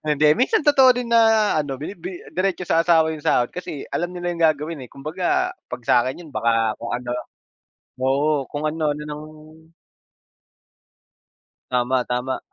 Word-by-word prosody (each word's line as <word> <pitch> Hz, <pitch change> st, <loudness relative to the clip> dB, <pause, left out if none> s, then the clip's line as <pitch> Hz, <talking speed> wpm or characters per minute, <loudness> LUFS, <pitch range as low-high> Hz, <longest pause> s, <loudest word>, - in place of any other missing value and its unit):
hindi, 150 Hz, 0 st, +4 dB
minsan 305 Hz, -, +2 dB
totoo 265 Hz, -3 st, +6 dB
din 245 Hz, -1 st, -3 dB
na 225 Hz, -2 st, +4 dB
ano, 140 Hz, -3 st, -4 dB
binibi 345 Hz, -, -7 dB
diretso 185 Hz, -1 st, -1 dB
sa 165 Hz, -, +4 dB
asawa 160 Hz, -2 st, +4 dB
'yung 155 Hz, -2 st, -9 dB
sahod 120 Hz, -1 st, +2 dB
kasi 160 Hz, -5 st, -6 dB
alam 175 Hz, +1 st, -1 dB
nila 175 Hz, 0 st, -2 dB
'yung 170 Hz, -1 st, -3 dB
gagawin, 155 Hz, +1 st, -3 dB
eh. -, -, -13 dB
Kumbaga 180 Hz, -, -1 dB, 0.2 s
'pag -, -, -7 dB
sa'kin 125 Hz, +8 st, +2 dB
'yun 155 Hz, -, -13 dB
baka 115 Hz, -1 st, +2 dB
kung 120 Hz, -, -5 dB
ano 120 Hz, 0 st, -4 dB, 0.9 s
oo, 140 Hz, +2 st, +1 dB
kung 145 Hz, +1 st, -4 dB
ano-ano 150 Hz, -1 st, -2 dB
ng 150 Hz, 0 st, -6 dB, 2.5 s
Tama 125 Hz, 0 st, +1 dB
tama. 125 Hz, +2 st, -2 dB
155 Hz, 150 wpm, -22 LUFS, 135-185 Hz, 2.5 s, totoo